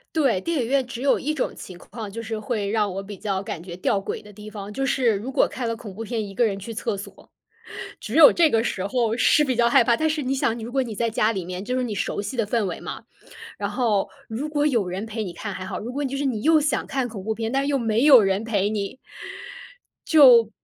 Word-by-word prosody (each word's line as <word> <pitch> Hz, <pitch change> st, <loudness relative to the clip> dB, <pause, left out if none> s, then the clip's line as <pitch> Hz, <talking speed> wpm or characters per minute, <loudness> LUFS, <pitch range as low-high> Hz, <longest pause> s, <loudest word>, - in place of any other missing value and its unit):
对， 265 Hz, -12 st, +2 dB
电 330 Hz, 0 st, -1 dB
影 -, -, -2 dB
院 265 Hz, 0 st, +1 dB
只 250 Hz, 0 st, -7 dB
有 280 Hz, -, +3 dB
一 305 Hz, +2 st, -2 dB
种 270 Hz, -, -2 dB
情 185 Hz, -, -10 dB
况， 215 Hz, +2 st, -8 dB
就 230 Hz, +3 st, -6 dB
是 220 Hz, -1 st, -4 dB
会 215 Hz, -4 st, -2 dB
让 210 Hz, -3 st, +1 dB
我 195 Hz, -, -4 dB
比 200 Hz, +1 st, -9 dB
较 195 Hz, -2 st, -2 dB
感 170 Hz, -4 st, -6 dB
觉 175 Hz, -1 st, -8 dB
吊 195 Hz, +2 st, 0 dB
诡 195 Hz, -, -5 dB
的 210 Hz, 0 st, -14 dB
地 210 Hz, +1 st, -11 dB
方， 205 Hz, -1 st, -8 dB
就 270 Hz, +5 st, -2 dB
是 245 Hz, -5 st, +2 dB
如 225 Hz, +7 st, -5 dB
果 -, -, +3 dB
看 245 Hz, -3 st, -4 dB
了 230 Hz, -, -2 dB
恐 210 Hz, -4 st, -10 dB
怖 225 Hz, -, -6 dB
片， 225 Hz, -2 st, -3 dB
一 195 Hz, -, -10 dB
个 235 Hz, +3 st, +3 dB
人 200 Hz, -2 st, -2 dB
去 215 Hz, +4 st, -7 dB
厕 210 Hz, -2 st, -2 dB
所， 195 Hz, -, -11 dB, 0.7 s
只 220 Hz, -, -6 dB
有 320 Hz, -3 st, +9 dB
这 335 Hz, -2 st, +4 dB
个 225 Hz, -1 st, +2 dB
时 190 Hz, -4 st, -2 dB
候 230 Hz, 0 st, 0 dB
是 300 Hz, -, +4 dB
比 260 Hz, -3 st, 0 dB
较 235 Hz, 0 st, +3 dB
害 235 Hz, -, +5 dB
怕， 235 Hz, 0 st, +3 dB
但 315 Hz, 0 st, +1 dB
是 305 Hz, -1 st, -1 dB
你 265 Hz, +1 st, -1 dB
想， 235 Hz, -3 st, 0 dB
如 230 Hz, +2 st, -7 dB
果 270 Hz, 0 st, +2 dB
你 230 Hz, -3 st, -5 dB
在 230 Hz, +2 st, -1 dB
家 220 Hz, 0 st, +2 dB
里 190 Hz, -4 st, -4 dB
面， 180 Hz, +2 st, -5 dB
就 250 Hz, +2 st, -2 dB
是 255 Hz, -, 0 dB
你 220 Hz, -, -3 dB
熟 200 Hz, -, -2 dB
悉 205 Hz, +5 st, -5 dB
的 220 Hz, -, +1 dB
氛 225 Hz, 0 st, 0 dB
围 185 Hz, -, -4 dB
嘛， -, -, -7 dB, 0.6 s
然 200 Hz, -, -2 dB
后 215 Hz, -3 st, 0 dB, 0.2 s
如 260 Hz, +7 st, -4 dB
果 295 Hz, 0 st, +1 dB
有 230 Hz, -9 st, +1 dB
人 190 Hz, +4 st, -4 dB
陪 220 Hz, 0 st, -4 dB
你 180 Hz, -, -5 dB
看 200 Hz, +3 st, -6 dB
还 185 Hz, 0 st, -6 dB
好， -, -, -5 dB
如 240 Hz, +3 st, -6 dB
果 290 Hz, -, -2 dB
就 275 Hz, 0 st, -3 dB
是 285 Hz, -, -2 dB
你 235 Hz, -6 st, -1 dB
又 315 Hz, +3 st, +5 dB
想 295 Hz, 0 st, 0 dB
看 265 Hz, -2 st, -2 dB
恐 205 Hz, -5 st, -8 dB
怖 220 Hz, +1 st, -1 dB
片， 225 Hz, +1 st, -3 dB
但 270 Hz, +1 st, +1 dB
是 -, -, -2 dB
又 280 Hz, -, +2 dB
没 225 Hz, +1 st, +1 dB
有 265 Hz, -6 st, +9 dB
人 195 Hz, +2 st, 0 dB
陪 205 Hz, -3 st, 0 dB
你。 210 Hz, +2 st, -3 dB, 1.1 s
就， 250 Hz, -8 st, +7 dB
225 Hz, 295 characters per minute, -23 LUFS, 205-260 Hz, 1.1 s, 有